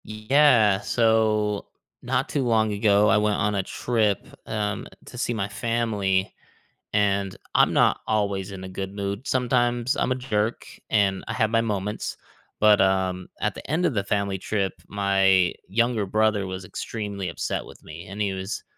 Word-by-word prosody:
Yeah, 110 Hz, -2 st, +4 dB
so, 110 Hz, -3 st, +1 dB, 0.3 s
not -, -, -1 dB
too 140 Hz, -, -1 dB
long 110 Hz, -3 st, +2 dB
ago, 105 Hz, 0 st, +3 dB
I 110 Hz, -, +5 dB
went 105 Hz, 0 st, +2 dB
on 105 Hz, +1 st, 0 dB
a 100 Hz, -, +1 dB
trip, 110 Hz, -2 st, 0 dB, 0.2 s
um, 105 Hz, -1 st, -2 dB, 0.2 s
to -, -, -11 dB
see 120 Hz, -, -1 dB
my 100 Hz, -3 st, -2 dB
family, 105 Hz, -4 st, -1 dB, 0.6 s
and 100 Hz, -2 st, +1 dB, 0.2 s
I'm -, -, +4 dB
not -, -, +3 dB
always 100 Hz, -3 st, -1 dB
in 95 Hz, -1 st, -8 dB
a 95 Hz, -, -7 dB
good 95 Hz, +1 st, -5 dB
mood, 100 Hz, +4 st, -4 dB
sometimes 120 Hz, -1 st, +1 dB
I'm -, -, 0 dB
a -, -, +2 dB
jerk, 115 Hz, -3 st, -2 dB, 0.2 s
and 100 Hz, -3 st, +2 dB
I -, -, -3 dB
have 110 Hz, -3 st, +1 dB
my 115 Hz, 0 st, +3 dB
moments, 105 Hz, -1 st, -3 dB, 0.4 s
but, 105 Hz, -1 st, +5 dB
um, 95 Hz, -1 st, +1 dB
at -, -, 0 dB
the -, -, -10 dB
end 165 Hz, +5 st, +1 dB
of 160 Hz, -, +1 dB
the 100 Hz, -3 st, 0 dB
family 100 Hz, -1 st, -1 dB
trip, 100 Hz, 0 st, -1 dB
my 95 Hz, -2 st, +3 dB
younger 115 Hz, +1 st, +1 dB
brother 105 Hz, -1 st, +1 dB
was 95 Hz, 0 st, -6 dB
extremely 100 Hz, -1 st, -5 dB
upset 85 Hz, -, -3 dB
with -, -, -15 dB
me, 80 Hz, +4 st, -10 dB
and 100 Hz, +2 st, -8 dB
he 100 Hz, -2 st, 0 dB
was 95 Hz, +1 st, -5 dB
105 Hz, 170 wpm, -24 LUFS, 95-110 Hz, 0.6 s, I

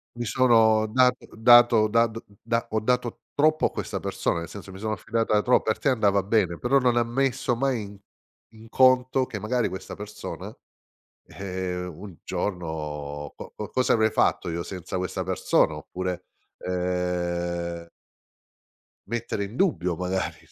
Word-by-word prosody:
Mi 120 Hz, 0 st, -4 dB
sono 110 Hz, -3 st, +4 dB
dat 125 Hz, +3 st, +3 dB, 0.2 s
dato 120 Hz, -1 st, +6 dB
da 115 Hz, +2 st, +4 dB
d 115 Hz, 0 st, -6 dB, 0.5 s
ho 110 Hz, -, 0 dB
dato 125 Hz, +1 st, -1 dB
troppo 155 Hz, +2 st, +3 dB
a -, -, +1 dB
questa -, -, -4 dB
persona, 85 Hz, -, -1 dB
nel 85 Hz, -, -6 dB
senso, 100 Hz, -1 st, -10 dB
mi 95 Hz, -, -10 dB
sono 110 Hz, +1 st, -2 dB
fidata 110 Hz, +1 st, 0 dB
trop 125 Hz, -, +3 dB
per 110 Hz, -, -1 dB
te 140 Hz, -, +1 dB
andava 100 Hz, -5 st, +3 dB
bene, 95 Hz, -4 st, +1 dB
però 135 Hz, +3 st, +3 dB
non 125 Hz, -2 st, +2 dB
ha 120 Hz, -, +4 dB
messo 120 Hz, 0 st, 0 dB
mai 130 Hz, -2 st, 0 dB
in 100 Hz, 0 st, -9 dB, 0.6 s
in 110 Hz, 0 st, -15 dB
conto 130 Hz, +1 st, +4 dB
che, 105 Hz, -, -6 dB
magari, 120 Hz, +3 st, 0 dB
questa 95 Hz, 0 st, -7 dB
persona, -, -, -8 dB, 0.7 s
eh, 90 Hz, -2 st, -4 dB
un 90 Hz, +1 st, -9 dB
giorno 75 Hz, -5 st, -4 dB
co -, -, -10 dB
co 105 Hz, -, -6 dB
cosa 130 Hz, +3 st, +1 dB
avrei 110 Hz, -1 st, +4 dB
fatto -, -, +1 dB
io 85 Hz, +1 st, -2 dB
senza 90 Hz, -1 st, -6 dB
questa 90 Hz, -1 st, -2 dB
persona. -, -, +1 dB
Oppure, 90 Hz, 0 st, -5 dB, 0.4 s
ehm 85 Hz, -1 st, -2 dB, 1.2 s
mettere 115 Hz, -2 st, -3 dB
in 100 Hz, +4 st, -7 dB
dubbio 90 Hz, -, +1 dB
magari 90 Hz, +1 st, -2 dB
105 Hz, 150 wpm, -25 LUFS, 90-120 Hz, 1.2 s, dato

